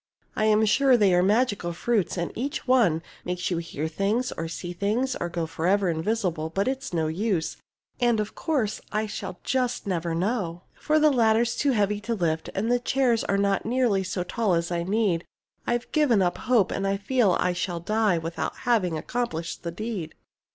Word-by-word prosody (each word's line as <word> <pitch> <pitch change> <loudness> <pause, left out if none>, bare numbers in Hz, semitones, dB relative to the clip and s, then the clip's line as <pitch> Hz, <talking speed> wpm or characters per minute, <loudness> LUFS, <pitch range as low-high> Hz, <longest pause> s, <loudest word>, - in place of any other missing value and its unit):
I 215 - +1
am 215 0 +4
sure 255 +4 +4
they 200 -4 +4
are 180 - +4
magical 205 -3 +1
fruits, 205 +2 0
and 170 -1 -2
each 270 +4 -4
one 210 -11 +3 0.2
Makes 180 +1 -3
you 175 - 0
hear 160 -2 -4
things, 200 +9 0
or 165 - -4
see 175 +2 -6
things, 220 +8 0
or 175 - -3
go 170 -1 -2
Forever 185 +4 +1
invisible; 165 -2 -1
but 195 +7 -1
it's 270 +1 -2
no 165 -2 0
use, 175 +1 -1 0.4
And 240 -2 +3
of 210 0 -3
course 265 -10 -1
I 215 +1 0
shall 185 -3 -6
just 250 -2 -1
never 170 -3 -1
know. 180 -2 -2
For 310 0 0
the 305 -1 +5
ladder's 230 -1 +3
too 280 -2 +1
heavy 205 -1 +1
to 230 +2 -2
lift, 160 -5 -1
and 220 +5 0
the 245 - +3
chairs 245 -2 +1
Are 200 - +1
not 200 0 +1
nearly 230 -4 +1
so 185 0 -2
tall 205 -1 0
as 170 +1 -1
I 170 -1 0
need. 190 -2 +1 0.4
I've 240 0 -1
given 255 -10 +3
up 175 -1 -1
hope, 225 -7 +4
and 195 - -1
I 195 0 +1
feel 210 -1 +2
I 180 - +1
shall 175 -1 -2
die 210 +1 +1
Without 165 +1 -3
having 190 -9 +2
accomplished 170 -4 -3
the 170 - -4
deed. 200 -2 -5
200 Hz, 195 wpm, -26 LUFS, 175-235 Hz, 0.4 s, the